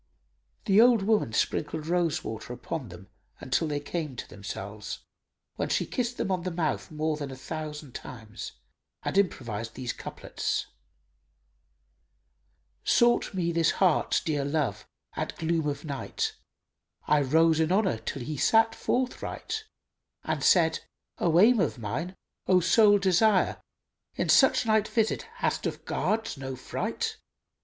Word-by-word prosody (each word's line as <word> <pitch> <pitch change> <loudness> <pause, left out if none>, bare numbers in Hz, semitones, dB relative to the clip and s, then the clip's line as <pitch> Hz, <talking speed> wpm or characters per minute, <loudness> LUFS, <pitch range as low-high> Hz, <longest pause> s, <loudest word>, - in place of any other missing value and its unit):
The 205 0 +6
old 235 -4 +5
woman 210 - +2
sprinkled 150 +6 -1
rose 170 -2 +1
water 110 +2 -6
upon 125 +1 -5
them 90 +2 -12 0.4
till 165 - +2
they 145 -1 -1
came 150 -1 -4
to - - -6
themselves, 100 +1 -7 0.5
when - - -1
she - - +1
kissed 245 -1 -2
him 195 - -1
on 185 -1 0
the 185 - -2
mouth 165 -3 -2
more 155 0 -1
than 145 -2 -5
a 135 - -7
thousand 150 0 -6
times 110 -4 -8 0.5
and - - -2
improvised 115 - -1
these 125 -2 -3
couplets, - - -3 2.2
"Sought 240 -4 +3
me 170 -2 0
this 165 -1 +2
heart's 185 -2 +3
dear 150 -3 -1
love 145 0 -1 0.3
at - - -3
gloom 165 -1 0
of 145 +1 -3
night; 140 -3 -3 0.4
* - - -58
I 150 0 +4
rose 160 +3 +4
in 160 +1 +2
honour 190 - +2
till 120 +3 -5
he 150 +4 -4
sat 225 +8 +4
forthright, 260 - -2 0.6
And - - -2
said, - - +4 0.4
'O 170 0 +3
aim 230 +4 +6
of 160 -7 0
mine, 135 - -4 0.3
O 185 -1 +5
sole 205 +4 +5
desire 195 +1 +3 0.3
* - - -47
In - - -1
such 265 -2 +5
night 220 -1 +3
visit 225 - 0
hast - - -1
of - - -6
guards 225 -6 -1
no 135 -1 -5
fright? - - -3
160 Hz, 145 wpm, -28 LUFS, 135-195 Hz, 2.2 s, The